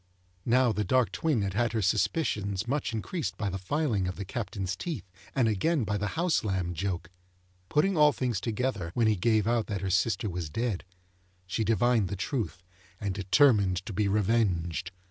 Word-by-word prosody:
Now, 125 0 +4
the 105 0 -1
dark 130 +1 +2
twin 145 -10 0
had 95 -1 -2
had 120 +2 +1
her 110 - 0
suspicions 100 - 0
much 140 -1 -1
increased 110 - -3
by 105 -3 -2
the 95 - -4
filing 110 - 0
of 90 - -3
the 100 - -5
Captain's 100 -3 -3
teeth, 155 - -5 0.3
and 130 -4 +3
again 130 - +1
by 105 -1 -1
the 105 - -1
house 170 -4 +2
lamb 95 -4 -1
joke. 90 0 -3 0.6
Putting 185 +6 +2
all 150 -1 +6
things 125 -7 -2
together 115 -6 -2
when 120 - +3
he 110 -1 +4
gave 110 +2 +2
out 115 -1 +1
that 100 -4 -3
her 95 -1 -1
sister 100 +2 +1
was 90 -4 -4
dead, 110 +1 -2 0.6
she 90 +5 -1
divined 115 -1 +2
the 100 - -4
truth, 100 -2 -3 0.4
and 100 -3 -2
determined 100 - +3
to 105 - -5
be 105 +2 +1
revenged. 95 -5 +1
105 Hz, 185 wpm, -29 LUFS, 95-120 Hz, 0.6 s, all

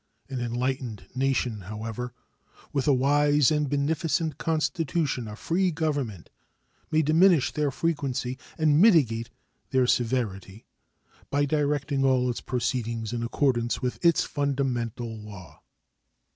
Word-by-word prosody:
An 130 -2 -4
enlightened 120 -3 -3
nation, 130 -4 0
however, 110 +4 -5 0.6
with 140 -1 0
a - - +6
wise 145 +2 +3
and 150 -2 +1
beneficent 155 +2 0
constitution 160 -5 -1
of 105 0 -8
free 185 +7 +1
government, 145 - -3 0.6
may 155 0 +2
diminish 160 0 +4
their 150 -1 0
frequency 135 -4 -2 0.2
and 155 0 +4
mitigate 125 - +4 0.4
their 130 -2 +3
severity 110 -5 -1 0.6
by 145 0 +2
directing 145 -1 0
all 130 -2 +3
its 120 - -6
proceedings 115 -2 -2
in 120 - -2
accordance 120 0 0
with 125 +6 -3
its 170 -2 +4
fundamental 125 -5 -2
law. 100 -7 -12
135 Hz, 115 wpm, -26 LUFS, 120-150 Hz, 0.6 s, a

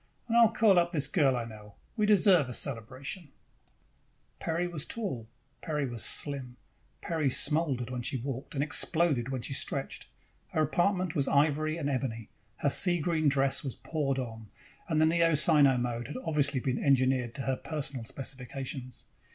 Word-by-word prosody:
And 230 - -1
I 235 - +7
will 230 - +7
call 215 -5 +4
up 175 +1 -1
this 145 -4 +2
girl 140 -3 +2
I 120 - -3
know. 105 -2 -12 0.2
We 215 -3 +1
deserve 185 - +4
a 125 - 0
celebration!" 135 - -4 1.1
Peri 170 +2 -1
was 165 -4 -3
tall. 160 - -4 0.3
Peri 150 -3 -2
was 120 -3 -1
slim. 130 -4 -2 0.4
Peri 160 -4 -1
smoldered 140 -3 +2
when 125 -1 -3
she 130 - -2
walked 130 +3 -6
and 140 - +1
exploded 145 -2 +1
when 130 -3 -4
she - - -3
stretched. 135 0 -2 0.5
Her 155 - +2
apartment 180 +3 0
was 140 -5 0
ivory 155 +2 +1
and 150 -4 -3
ebony, 125 -5 -3 0.3
her 145 - +1
sea 175 +2 +4
green 155 -1 +1
dress 135 -1 +1
was 135 -4 -5
poured 145 -4 -2
on, 115 -4 -6 0.4
and 160 -2 +1
the 155 - +5
Neo 165 0 +3
Sino 145 -3 +5
mode 120 -1 -3
had 150 - -6
obviously 145 -3 +1
been 125 0 -2
engineered 130 -3 +2
to 135 - -4
her 135 0 0
personal 140 -4 -3
specifications. 130 +1 -6
140 Hz, 170 wpm, -29 LUFS, 130-160 Hz, 1.1 s, I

